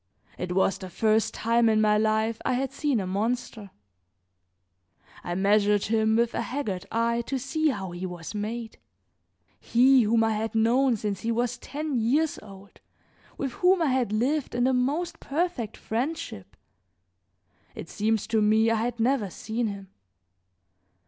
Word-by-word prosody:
It 180 0 -4
was 190 +1 +1
the 185 - -8
first 215 +4 +1
time 230 0 +2
in 215 -1 +3
my 210 -1 +4
life 220 +1 +1
I - - 0
had 265 +2 -1
seen 280 -3 0
a 190 - -3
monster; 215 +2 -3 1.5
I 175 - -3
measured 205 +1 +3
him 220 0 +2
with 235 0 +1
a - - -1
haggard 230 -8 -4
eye 235 +1 +1
to 270 - -1
see 295 +5 -1
how 195 -10 -2
he 175 +2 -5
was 175 +1 -8
made. 220 +2 -5 0.8
He 255 +2 +4
whom 225 +1 +3
I 225 - +2
had 220 +1 -3
known 240 +3 +3
since 205 -2 -3
he 230 - -2
was 240 +1 -1
ten 295 -2 -3
years 290 +8 +1
old, 195 -1 -14 0.6
with 270 -2 -3
whom 360 +5 +3
I 305 - +2
had 250 -5 0
lived 255 +6 0
in 245 - +1
the 260 +1 +3
most 305 +7 -1
perfect 285 - -2
friendship, 240 - -4 1.2
it - - -7
seemed 215 +3 -1
to 220 -1 +2
me 220 +2 +3
I - - +2
had 235 +1 -2
never 235 -3 +1
seen 220 +5 -3
him. 200 -2 -7
225 Hz, 160 wpm, -26 LUFS, 210-255 Hz, 1.5 s, my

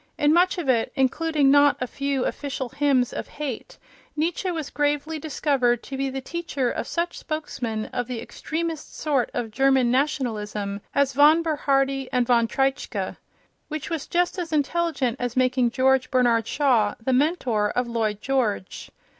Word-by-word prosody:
In 295 0 +3
much 360 +2 +3
of 340 -5 -3
it, 235 -3 +2
including 290 +1 +2
not 285 0 +5
a 250 - -1
few 275 +1 -2
official 265 -3 -3
hymns 270 -2 +1
of - - -5
hate, 285 -6 -6 0.4
Nietzsche 335 +4 -1
was 320 -5 -4
gravely 295 +2 -1
discovered 270 -5 0
to 275 - -7
be 270 0 -1
the 270 0 -4
teacher 290 -4 -2
of - - -4
such 340 +1 -2
spokesmen 240 -8 -4
of 245 -2 -2
the 250 -2 -4
extremest 320 +6 -5
sort 280 -6 0
of 225 -2 -3
German 265 0 +3
nationalism 215 -7 -1
as 280 -1 +2
von 300 +5 +6
Bernhardi 275 -4 0
and 250 -1 +2
von 235 -2 +3
Treitschke—which 270 +3 -4
was 325 -4 -3
just 355 +2 0
as 340 -2 -4
intelligent 305 -4 0
as 245 0 -3
making 255 -1 +3
George 260 +1 +2
Bernard 235 -3 +2
Shaw 240 -8 +2
the 255 +3 -1
mentor 250 -7 +1
of 250 +3 0
Lloyd 220 -3 -1
George. 240 -8 -1
270 Hz, 155 wpm, -24 LUFS, 245-300 Hz, 0.4 s, von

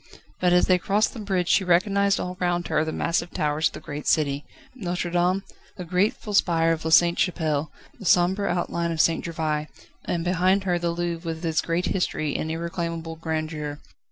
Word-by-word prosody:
But 180 -1 +3
as 180 0 +5
they 185 -1 +3
crossed 205 +4 +1
the 240 - -8
bridge 190 -4 -1
she 195 - +4
recognised 200 +3 +2
all 180 0 -4
round 175 -1 0
her - - +2
the 160 - -3
massive 170 +1 -1
towers 150 0 0
of - - -8
the - - -7
great 145 0 -7
city: 145 -2 +1 0.3
Notre 180 -7 -3
Dame, 180 +2 +1 0.3
the 180 - -6
grateful 195 +4 0
spire 165 -4 +3
of 160 -1 -2
La 160 - -1
Sainte 170 +1 +5
Chapelle, 155 -4 0 0.3
the 205 - -9
sombre 185 +4 +3
outline 170 -1 -1
of 165 - -4
St. 165 +1 +3
Gervais, 155 -2 -2 0.4
and 170 -1 -1
behind 185 +2 +2
her 180 -2 0
the 170 0 -1
Louvre 170 0 -3
with 160 +2 -8
its 160 -1 +1
great 170 +1 -1
history 155 -6 -1
and 160 - -2
irreclaimable 165 0 -4
grandeur. 155 -2 -3
170 Hz, 190 wpm, -25 LUFS, 160-180 Hz, 0.4 s, as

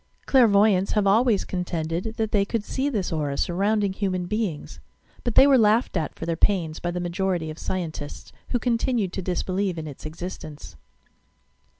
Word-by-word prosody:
Clairvoy 220 -5 +5
ants 190 0 0
have 210 -2 +2
always 220 +1 +3
contended 175 +3 -3
that 220 -2 -1
they 200 -2 +3
could 210 +1 -2
see 270 +6 -1
this 205 -10 -2
aura, 145 -3 -2
surrounding 200 +2 +1
human 185 -3 -2
beings, 205 -5 -3 0.4
but 240 - -2
they - - +8
were 275 -2 +5
laughed 220 +2 +3
at 160 -4 -2
for - - -6
their 165 0 -1
pains 165 -3 +1
by 175 - -2
the 175 +1 -3
majority 175 -2 -1
of 155 - -10
scientists, 160 -5 -5 0.2
who 245 - +1
continued 230 -4 0
to 190 - -3
disbelieve 185 +1 -1
in 160 - -5
its 145 -3 -9
existence. 155 - -8
190 Hz, 175 wpm, -24 LUFS, 170-215 Hz, 0.4 s, they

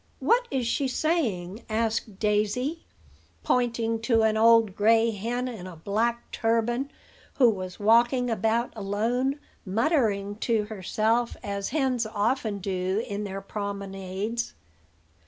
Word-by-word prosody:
"What 485 +1 +2
is 260 -3 -1
she 270 +4 0
saying?" 235 - -1
asked 220 -2 -1
Daisy, 215 +10 0 0.6
pointing 230 - +1
to 230 -1 +3
an 220 0 +3
old 225 -2 +5
gray 225 +2 +4
hen 235 +5 -2
in 215 -7 -7
a 180 - -9
black 225 +8 -1
turban, 235 +4 0 0.5
who 255 - +6
was 185 -3 -6
walking 240 +4 +4
about 225 +2 0
alone, 230 +7 -1 0.2
muttering 210 - +1
to 225 -1 +1
herself, 220 +3 0
as 200 -1 -3
hens 260 -6 0
often 220 +1 0
do 190 +2 -1
in 205 +1 -3
their 195 0 -5
promenades. 200 +2 -4
225 Hz, 120 wpm, -27 LUFS, 200-240 Hz, 0.6 s, who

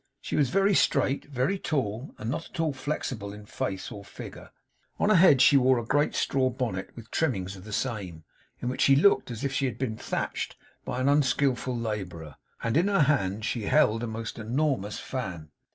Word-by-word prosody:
She - - -4
was 140 -4 +3
very 195 +1 +3
straight, 140 -6 +2
very 140 +8 -1
tall, 125 - -2
and 110 - -6
not 165 +3 -4
at - - -10
all 160 -3 +1
flexible 130 -6 -4
in 105 0 -11
face 95 0 -4
or 105 -3 -8
figure. - - -10 0.5
On - - +2
her 215 - +5
head 160 -7 +7
she 145 - +7
wore 130 -1 +4
a 120 - -2
great 145 +5 +1
straw 130 -1 +1
bonnet, 120 -7 -3
with 115 -1 -11
trimmings 100 - -1
of 95 +1 -12
the 110 - -9
same, 100 -9 -3 0.4
in - - -3
which 125 - -2
she 135 - +6
looked 180 +2 +4
as 115 -3 -6
if 140 -1 -1
she 140 - +1
had 120 -3 -5
been 120 -4 -2
thatched - - -3 0.3
by 125 - -3
an 130 - +1
unskillful 130 -3 +2
labourer; 95 -9 -5 0.3
and 115 +4 +1
in 175 +4 +3
her 200 -4 +3
hand 110 -8 +1
she 115 -4 -2
held 115 -6 +3
a 120 - -2
most 115 +1 -5
enormous 120 -2 -1
fan. 90 -12 -5
125 Hz, 200 wpm, -27 LUFS, 105-140 Hz, 0.5 s, head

